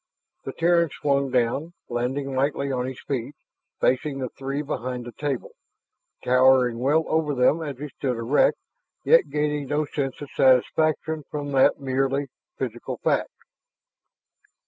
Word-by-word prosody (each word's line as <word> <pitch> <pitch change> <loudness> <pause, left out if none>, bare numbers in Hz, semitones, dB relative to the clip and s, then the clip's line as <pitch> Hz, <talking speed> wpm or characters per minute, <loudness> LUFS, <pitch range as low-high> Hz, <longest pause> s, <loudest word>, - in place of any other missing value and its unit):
The 135 - -5
Terran 170 0 +3
swung 140 -1 0
down, 130 +6 0
landing 130 +3 -2
lightly 140 +1 0
on 125 -1 -1
his 130 -1 -7
feet, 135 +1 -4 0.4
facing 135 +2 +1
the 130 -2 -3
three 135 +4 -4
behind 125 -4 -4
the 120 - -7
table, 140 -1 -4 0.7
towering 125 -1 +4
well 145 +6 +2
over 155 -2 0
them 130 +6 +3
as 145 -5 -5
he 150 +2 -6
stood 130 -1 -3
erect, 130 - +2 0.5
yet - - +5
gaining 150 -1 -1
no 150 +2 0
sense 140 -2 -3
of 145 - -8
satisfaction 155 +4 +2
from 145 -1 -4
that 135 +1 +4
merely 135 +1 -1 0.3
physical - - -4
fact. - - +1
140 Hz, 140 wpm, -24 LUFS, 130-150 Hz, 0.7 s, yet